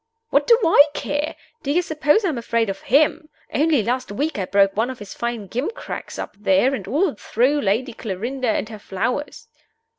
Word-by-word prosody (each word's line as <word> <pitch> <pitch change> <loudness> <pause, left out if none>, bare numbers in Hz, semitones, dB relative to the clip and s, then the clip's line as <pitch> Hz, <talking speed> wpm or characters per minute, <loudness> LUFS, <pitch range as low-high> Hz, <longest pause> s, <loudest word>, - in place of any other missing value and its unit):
"What - - +3
do 470 -1 +7
I 330 -3 +8
care? 295 +2 -2 0.3
Do 275 - -5
you 350 +4 +2
suppose 315 +5 +2
I'm 305 -9 -1
afraid 230 -2 0
of 195 - -9
him? 305 +4 +2 0.2
Only 300 -5 +3
last 250 +1 -2
week 285 +5 -2
I 190 - -1
broke 195 +1 +3
one 225 +4 +1
of 260 - -6
his 205 -2 -9
fine 235 -3 -3
gimcracks 260 - -5
up - - -6
there, 205 +6 +3
and 205 -8 -4
all 305 - +1
through 255 +7 +1
Lady 230 +5 0
Clarinda 235 +5 -3
and 215 - 0
her 215 -2 -8
flowers!" 245 +9 -3
250 Hz, 185 wpm, -22 LUFS, 210-295 Hz, 0.3 s, I